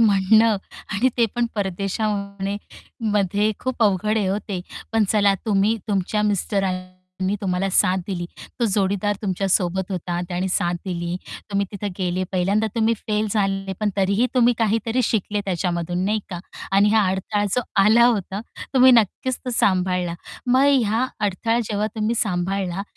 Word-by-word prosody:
म्हणणं 215 +1 +4 0.4
आणि 220 +6 +2
ते 235 -1 +4
पण 240 0 +1
परदेशमध्ये 200 0 -2 0.6
मध्ये 205 +1 +2
खूप 260 -2 -2
अवघड 210 +1 +2
आहे 195 - 0
ओ 200 - 0
ते. 190 -3 -2 0.3
पण 225 -1 +3
चला 205 -2 +4
तुम्ही 210 +1 +2
तुमच्या 205 +1 0
मिस्टरांनी 195 -3 -1 0.5
तुम्हाला 190 -1 0
साथ 185 0 +3
दिली, 180 -3 -3 0.4
तो - - +3
जोडीदार 200 0 0
तुमच्या 195 -1 -1
सोबत 190 0 +1
होता, 175 -1 -3
त्यानी 180 +1 -2
साथ 175 -1 +1
दिली. 175 -1 -3 0.3
तुम्ही 200 0 0
तिथे 205 +1 -4
गेले, 185 0 -1
पहिल्यांदा 195 +4 +1
तुम्ही 230 0 +2
फेल 215 0 -2
झाले 195 -2 0
पण 210 -1 +1
तरीही 200 +5 +2
तुम्ही 245 -1 +4
काहीतरी 225 +2 +1
शिकले 210 -1 0
त्याच्यामधून 175 -1 -2
नाही 215 +2 +1
का 175 - -4 0.3
आणि 200 +2 +5
हा 215 -3 +4
अडथळा 190 +2 -1
जो 250 - +2 0.2
आला 225 +4 +6
होता, 205 -4 +1 0.3
तुम्ही 260 0 +7
नक्कीच 240 +3 +2
तो 250 - -2
सांभाळला. 180 -3 +1 0.3
मग 255 +2 +4 0.2
ह्या 225 +5 +1 0.2
अडथळा 225 +4 0
जेव्हा 210 +1 0
तुम्ही 220 +1 0
सांभाळला, 190 -1 -1
200 Hz, 150 wpm, -22 LUFS, 185-215 Hz, 0.6 s, तुम्ही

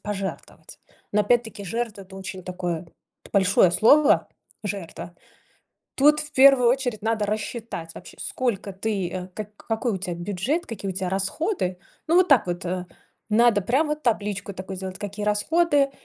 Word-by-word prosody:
пожертвовать. 200 -2 -6 0.3
Но 210 0 +3
опять-таки 225 -1 0
жертва- 220 0 -3
это 190 0 -14
очень 190 -1 -7
такое 180 -2 -4 0.5
большое 190 -2 +4
слово, 280 - +5 0.3
жертва. 180 -4 -6 0.8
Тут 300 +2 +5
в 300 0 -8
первую 265 -3 +7
очередь 245 -5 -1
надо 220 -2 0
рассчитать 210 -5 -4
вообще, - - -12
сколько 215 -6 -2
ты, 195 -2 -2
э, 185 0 -5
как 210 -1 -7
какой 225 +1 -2
у 190 - -2
тебя 180 -1 -4
бюджет, 205 - -2
какие 205 -4 -5
у - - -6
тебя 185 0 -2
расходы. 195 - -1 0.3
Ну, 325 - +2
вот 365 0 +5
так 265 -10 +5
вот, 175 0 -3
э, 180 0 -3 0.4
надо 225 -1 +4
прям 265 +10 +1
вот 300 0 -3
табличку 205 -4 -1
такую 190 +1 -6
сделать, 190 0 -6
какие 205 0 -5
расходы, 285 +6 +2
210 Hz, 155 wpm, -24 LUFS, 190-240 Hz, 0.8 s, первую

